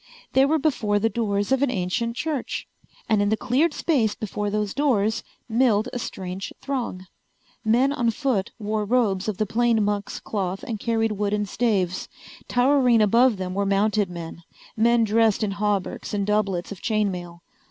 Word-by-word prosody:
They 265 +1 +5
were 315 +2 +3
before 245 -9 +1
the 225 +2 +1
doors 205 -2 -1
of 265 0 +3
an 280 - +3
ancient 230 +3 -1
church. 295 -2 -3 0.4
And 215 -2 +3
in 205 - +2
the 220 - +1
cleared 260 +8 +2
space 255 -9 +1
before 210 -1 -3
those 210 -1 -1
doors 225 -7 +1 0.3
milled 230 -1 +2
a 245 - -2
strange 190 -3 -5
throng. 245 -9 -4 0.6
Men 245 +6 +3
on 240 -4 +1
foot 230 -5 -1
wore 215 0 -2
robes 205 -4 +1
of 210 -3 -2
the 215 - +1
plain 225 0 +2
monk's 205 -1 -2
cloth 195 -2 -3
and 220 -3 -4
carried 225 0 0
wooden 210 0 -1
staves. 195 -4 -1 0.4
Towering 250 -2 +4
above 230 +2 +4
them 185 -1 -4
were 200 +1 0
mounted 200 0 +1
men, 170 -1 -8 0.3
men 235 +1 +4
dressed 220 0 +2
in 205 - 0
hauberks 205 0 -2
and 200 -1 0
doublets 200 -4 0
of 200 - -8
chain 215 -3 +1
mail. 175 -1 -8
215 Hz, 170 wpm, -24 LUFS, 200-240 Hz, 0.6 s, They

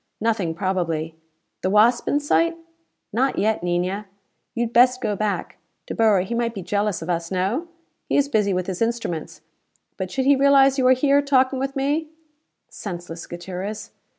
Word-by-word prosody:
Nothing, 210 -7 0
probably." 170 -4 -2 0.5
"The 185 - 0
Wasp 220 +4 +4
in 290 - +2
sight?" 330 +3 +1 0.6
"Not 260 +4 +1
yet, 215 +1 +1
Niña. 180 +4 -1 0.5
You 235 - 0
had 235 0 -4
best 250 +2 +5
go 210 -5 -1
back: 210 0 -3 0.3
De - - -5
Boer, 215 -5 +3
he 190 +6 -4
might 235 -1 -1
be 195 - -5
jealous 205 -2 -1
of 165 - -8
us, 170 -1 -2
no? 195 - -1 0.4
He - - +2
is 285 -1 +3
busy 210 -7 +1
with 180 -1 -1
his 185 +1 -5
instruments, 225 -10 -2 0.6
but 190 -1 -4
should 260 +7 -2
he 280 +1 +6
realize 275 0 +5
you 255 - +3
are 255 - +7
here, 280 +2 +3
talking 265 -2 +2
with 275 +1 -3
me 290 +4 0 0.3
" 310 - -52
"Senseless, 175 -3 -7
Gutierrez!" 185 +4 -6
215 Hz, 180 wpm, -23 LUFS, 185-265 Hz, 0.6 s, are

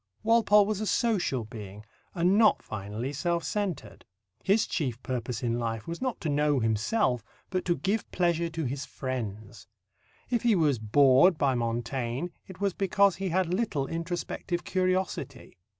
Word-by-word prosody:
Walpole 215 -2 +5
was 210 0 -2
a 215 - -2
social 185 - +1
being, 105 -1 -9 0.3
and 180 +2 +3
not 215 -1 +4
finally 110 +6 -5
self 170 +3 -1
centred. 200 -7 -3 0.4
His 205 +3 +3
chief 130 -8 -2
purpose 125 -2 -3
in 120 0 0
life 115 -2 -3
was 170 +5 -5
not 255 -2 -2
to - - -3
know 145 -1 +2
himself, 115 - +1 0.3
but 185 -1 -1
to 175 -1 +1
give 200 +10 -1
pleasure 170 -1 +1
to 160 -1 -3
his 135 +3 -3
friends. 110 -6 -6 0.6
If 240 -3 +2
he 235 -3 +3
was 150 - +2
bored 135 - +5
by 140 -2 +2
Montaigne, 120 +4 -2 0.2
it 190 -2 -11
was 200 -2 0
because 195 -1 +2
he 190 0 -2
had 180 0 0
little 185 -10 0
introspective 175 +2 -3
curiosity. 185 - -2
160 Hz, 155 wpm, -28 LUFS, 120-190 Hz, 0.6 s, Walpole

